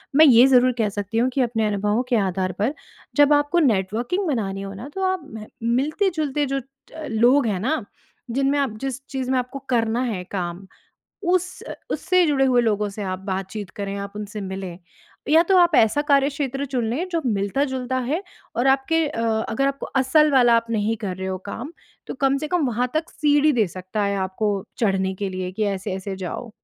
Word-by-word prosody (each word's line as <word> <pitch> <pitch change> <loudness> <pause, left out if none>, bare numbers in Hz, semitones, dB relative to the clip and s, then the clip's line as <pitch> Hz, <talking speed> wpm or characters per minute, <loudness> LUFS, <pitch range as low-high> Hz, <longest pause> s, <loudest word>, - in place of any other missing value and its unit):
मैं 315 +2 +8
ये 245 -3 +8
ज़रूर 255 -1 +5
कह 215 - +2
सकती 205 +2 -4
हूँ 250 +2 +2
कि 270 - +1
अपने 225 -3 +1
अनुभवों 210 +3 0
के 245 - +3
आधार 185 0 -1
पर 230 +8 +1 0.4
जब 290 0 +6
आपको 290 +4 +2
नेटवर्किंग 230 - 0
बनानी 195 -9 -2
हो 195 0 -6
ना 220 +8 -8
तो 385 - -2
आप 375 - -3
मह 220 -1 -7 0.3
मिलते-जुलते 300 0 0
जो 275 +1 -1
अ, 275 +4 -12
लोग 240 +4 +4
हैं 200 -4 -1
ना, 260 +6 -1 0.5
जिनमें 275 +3 +1
आप 260 -6 -1
जिस 270 -1 -3
चीज़ 260 -1 -3
में 260 - +3
आपको 250 +2 -5
करना 230 -1 +1
है 180 -2 -4
काम 180 0 -4 0.7
उस 360 0 -1
अ, - - -7 0.2
उससे 365 -1 +2
जुड़े 275 -3 +3
हुए 250 -2 +4
लोगों 210 -2 0
से 205 +1 -6
आप 185 -1 -3
बातचीत 195 +1 -5
करें, 200 -1 -3
आप 200 0 -6
उनसे 210 0 -6
मिलें। 190 -2 -6 0.5
या 320 +2 +7
तो 380 - +6
आप 350 -1 +5
ऐसा 225 +6 +4
कार्यक्षेत्र 280 -1 +1
चुन 255 -4 -2
लें 305 +11 -2
जो 335 - 0
मिलता-जुलता 255 +4 -1
है 315 +7 0 0.4
और 245 +3 +2
आपके 290 +5 +2
अ, 255 -6 -4 0.3
अगर 275 +5 +1
आपको 275 0 -3
असल 300 +3 +4
वाला 240 -3 +5
आप 230 - -1
नहीं 220 0 0
कर 190 -3 -2
रहे 190 - -4
हो 185 0 -2
काम 240 +8 -6 0.4
तो - - -4
कम 270 +1 +3
से 305 - -4
कम 350 -5 +1
वहाँ 245 +2 -1
तक 320 +1 -1
सीढ़ी 295 0 +3
दे 200 - +2
सकता 185 +4 -4
है 200 0 0
आपको 190 +3 -1 0.3
चढ़ने 190 -3 +1
के 195 - -1
लिए 185 -1 -4
कि 215 +3 -2
ऐसे-ऐसे 190 0 -5
जाओ। 190 +6 -5
245 Hz, 200 wpm, -23 LUFS, 200-280 Hz, 0.7 s, मैं